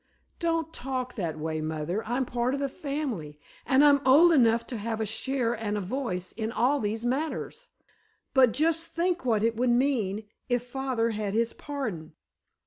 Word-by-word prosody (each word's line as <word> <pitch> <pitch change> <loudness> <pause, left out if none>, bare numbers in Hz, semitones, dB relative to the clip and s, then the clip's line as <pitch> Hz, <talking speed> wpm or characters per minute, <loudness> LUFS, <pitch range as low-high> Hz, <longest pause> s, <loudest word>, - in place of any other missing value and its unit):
"Don't 330 -2 -1
talk 255 -1 -4
that 170 -8 -3
way, 155 0 -3
mother. 155 +6 -2
I'm 250 +3 0
part 245 +2 -1
of - - -4
the 275 0 -1
family, 260 - -4 0.3
and 270 +2 +5
I'm 285 -1 +6
old 300 +7 +7
enough 235 -4 +4
to - - -2
have 220 +1 -3
a 220 - 0
share 235 +2 -1
and 215 -2 -2
a - - 0
voice 185 -4 -3
in 220 0 -4
all 255 +5 +2
these 220 +1 -2
matters. 310 - -2 0.7
But 260 -3 +6
just 325 +6 +2
think 340 0 -1
what 220 -4 +2
it 230 0 +2
would 245 +2 +1
mean, 240 -5 +1 0.3
if 245 -1 +1
father 250 -3 -1
had 210 -2 -3
his 230 +1 +1
pardon! 220 - -5
245 Hz, 175 wpm, -28 LUFS, 215-275 Hz, 0.7 s, old